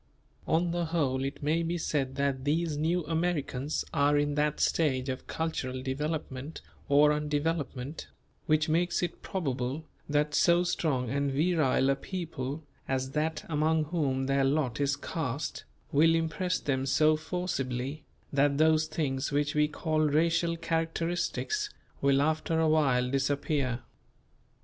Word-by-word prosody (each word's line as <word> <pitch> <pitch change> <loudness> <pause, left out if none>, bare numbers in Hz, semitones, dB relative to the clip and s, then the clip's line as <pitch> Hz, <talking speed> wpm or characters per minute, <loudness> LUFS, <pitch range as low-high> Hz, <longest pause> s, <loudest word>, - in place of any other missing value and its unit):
'" 65 +3 -31
On 170 +1 +1
the 175 0 0
whole 140 -6 0
it 135 +1 -4
may 155 +3 +2
be 170 +1 -1
said 135 -5 -1
that 140 -1 0
these 155 +2 0
new 165 +3 0
Americans 155 -4 -1
are 145 +1 +3
in 145 0 +1
that 150 0 0
stage 135 -5 +1
of 130 0 -5
cultural 130 -6 -3
development 145 +1 -4 0.3
or 145 +1 +6
undevelopment, 150 -1 -2 0.4
which 155 0 +3
makes 175 +3 +1
it 175 - -3
probable 140 -4 -3 0.2
that 150 0 +1
so 170 +2 +4
strong 140 -8 0
and 140 0 0
virile 145 -3 +2
a - - +2
people 155 -3 -5 0.2
as 130 0 -1
that 155 +1 -1
among 155 0 +2
whom 145 -5 -1
their 135 0 +2
lot 135 -2 +1
is 140 0 +2
cast, 145 -1 -4 0.3
will 165 +3 +5
impress 165 +3 0
them 135 -1 -1
so 155 +3 +4
forcibly, 155 -5 -3 0.3
that 140 0 +3
those 155 0 +4
things 135 -4 -2
which 145 0 +1
we 150 0 +3
call 155 +1 -1
racial 165 +3 +2
characteristics 165 - -1 0.3
will 140 0 +4
after 155 +1 0
a 160 - +3
while 135 -5 +3
disappear. 140 -2 0
150 Hz, 140 wpm, -29 LUFS, 135-160 Hz, 0.4 s, or